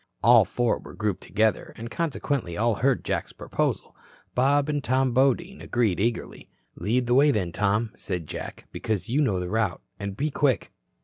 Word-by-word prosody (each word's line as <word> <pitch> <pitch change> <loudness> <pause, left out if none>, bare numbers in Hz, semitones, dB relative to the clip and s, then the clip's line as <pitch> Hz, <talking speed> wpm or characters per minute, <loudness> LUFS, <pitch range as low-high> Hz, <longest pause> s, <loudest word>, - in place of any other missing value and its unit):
All 115 -1 +7
four 120 +5 0
were - - -12
grouped 105 -4 -1
together, 110 +1 0
and 115 +1 -7
consequently 140 - -2
all 115 +2 +2
heard 130 +4 +1
Jack's - - -2
proposal. - - -2 0.4
Bob 140 +3 +3
and 145 -2 -1
Tom 130 0 +1
Bodine 140 +10 +2
agreed 115 -7 0
eagerly. 115 +3 -2 0.2
"Lead 115 +8 0
the 120 - +1
way, 140 +4 +6
then, 95 -10 0
Tom," 105 +4 +1
said 90 -4 -4
Jack, - - -7
"because 110 0 -3
you 140 +6 +2
know 105 -10 +1
the 90 - -3
route. 105 -1 -1 0.2
And 100 -1 -5
be 150 +2 0
quick." 135 -7 +1
115 Hz, 175 wpm, -26 LUFS, 105-135 Hz, 0.4 s, All